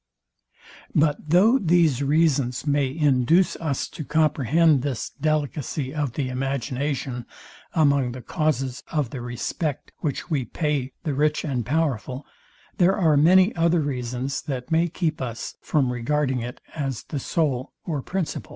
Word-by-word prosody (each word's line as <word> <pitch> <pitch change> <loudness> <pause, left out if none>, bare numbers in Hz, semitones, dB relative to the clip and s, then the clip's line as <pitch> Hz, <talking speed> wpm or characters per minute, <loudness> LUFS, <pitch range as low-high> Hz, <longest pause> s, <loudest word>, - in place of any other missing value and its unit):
But 150 0 +1
though 210 - +5
these 165 - +3
reasons 140 -4 +2
may 145 -2 +2
induce 150 +4 +3
us 145 -5 -2
to 155 - -7
comprehend 155 0 +3
this 135 -3 -3
delicacy 145 -2 -2
of 145 -5 -2
the 140 -3 -2
imagination 135 -1 -2 0.5
among 140 -5 +3
the 125 -1 -8
causes 135 -4 -1
of 150 -7 -1
the 130 - -5
respect, 125 +5 -3
which 145 -4 -3
we 140 -4 +1
pay 140 0 -2
the 155 -4 -1
rich 150 +3 +1
and 130 -5 -1
powerful, 135 -2 -1 0.5
there 185 +1 +4
are 165 -6 +4
many 185 +7 +5
other 170 0 +3
reasons, 130 -2 -2
that 135 -1 -5
may 165 +2 +3
keep 160 -3 -2
us 120 -3 -5
from 130 -5 +1
regarding 130 +2 0
it 120 +1 -6
as 135 -6 -3
the 145 - -4
sole 135 -3 -1
or 150 -5 -2
principal. 180 +3 -3
145 Hz, 140 wpm, -24 LUFS, 130-155 Hz, 0.5 s, though